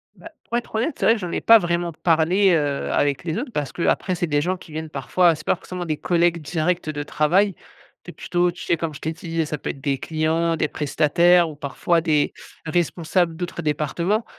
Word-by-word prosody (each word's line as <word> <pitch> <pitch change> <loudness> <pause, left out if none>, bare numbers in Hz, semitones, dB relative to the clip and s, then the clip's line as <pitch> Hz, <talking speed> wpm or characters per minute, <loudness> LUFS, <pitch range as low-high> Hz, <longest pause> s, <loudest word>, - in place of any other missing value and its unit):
Bah, 330 - -12
pour 235 - -1
être 240 - -6
honnête, 250 +7 0
c'est - - -1
vrai 225 - +6
que - - -5
j'en 175 -2 -5
ai - - -2
pas 225 -1 +7
vraiment 170 -1 -1
parlé, 175 +4 +3
heu, 145 -3 0
avec 145 +1 +1
les 165 +3 -3
autres 245 0 -4
parce 145 -2 -2
qu'après, 180 +1 0
c'est 175 0 -1
des 145 -1 +1
gens 185 +3 -1
qui 170 -3 -15
viennent 160 0 -5
parfois 165 +5 +2
c'est 150 - -12
pas - - +2
forcément 180 0 -7
des 155 -2 -2
collègues 170 -1 +1
directs 165 +2 -1
de 145 -1 -3
travail. 180 +7 +2 0.5
Tu - - -9
es - - -18
plutôt 175 0 0
tu - - -10
sais 170 - +1
comme 160 -1 -3
je - - -10
t'ai 160 +1 -2
dit, 165 -2 -3
ça 150 0 -4
peut - - -6
être 135 - -6
des 140 -1 0
clients, 165 +2 0
des 155 - 0
prestataires 170 +4 +3
ou 150 - -9
parfois 150 +4 0
des 155 -3 +1 0.3
responsables 170 +1 0
d'autres 175 0 -5
départements. 170 +8 -1
170 Hz, 225 wpm, -22 LUFS, 155-180 Hz, 0.5 s, pas